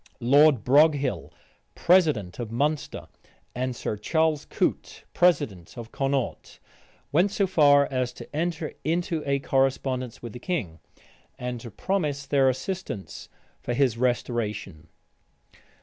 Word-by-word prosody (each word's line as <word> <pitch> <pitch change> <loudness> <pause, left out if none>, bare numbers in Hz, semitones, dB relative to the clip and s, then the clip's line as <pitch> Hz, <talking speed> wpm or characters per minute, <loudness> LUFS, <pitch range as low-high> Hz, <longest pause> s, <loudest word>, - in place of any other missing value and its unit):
Lord 140 0 +5
Broghill, 145 0 +3 0.4
president 155 - +2
of 115 -2 -5
Munster, 145 +5 -2 0.5
and 125 0 -3
Sir 105 - -4
Charles 160 +6 0
Coote, - - -2
president 140 - +1
of 115 -1 -8
Connaught, 135 -2 -2 0.5
went 175 +7 +3
so 200 0 0
far 145 -6 +5
as 130 -2 -1
to - - -11
enter 165 0 -2
into 165 0 -1
a 140 0 +2
correspondence 135 -2 -1
with 120 -2 -8
the 125 - -8
king, 120 - -3 0.6
and 125 -1 -4
to 115 - -8
promise 150 - -2
their 135 -1 +3
assistance 130 - -5 0.3
for 120 - -3
his 130 -3 +2
restoration. 110 -8 -2
135 Hz, 120 wpm, -26 LUFS, 120-155 Hz, 0.6 s, Lord